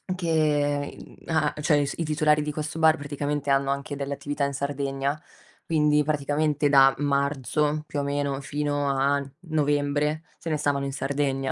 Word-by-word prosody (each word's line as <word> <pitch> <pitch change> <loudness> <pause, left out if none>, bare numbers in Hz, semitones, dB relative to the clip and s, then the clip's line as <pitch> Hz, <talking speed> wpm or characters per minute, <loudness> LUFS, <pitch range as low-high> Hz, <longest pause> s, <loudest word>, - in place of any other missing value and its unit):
che, 150 -4 0
mhmm, - - -13
a 155 -2 +1
cioè 150 0 +3
i - - +1
s 140 - -3
i 165 - -1
titolari 150 0 +2
di 150 0 -3
questo 155 +1 -4
bar, 160 -1 +6
praticamente 145 0 -3
hanno 135 0 +2
anche 140 +1 -4
delle 140 0 -3
attività 145 0 -2
in 140 - -3
Sardegna, 140 +1 -2 0.4
quindi 150 -2 +3
praticamente 145 0 +1
da 135 -1 +6
marzo, 145 +1 0
più 145 - -4
o 140 - -1
meno, 140 -1 -1
fino 145 0 -2
a 140 +1 +2 0.3
novembre, 145 0 0
se 165 - -6
ne 155 - +1
stavano 145 -2 0
in 135 - -4
Sardegna, 135 -1 -1
145 Hz, 170 wpm, -25 LUFS, 140-150 Hz, 0.4 s, bar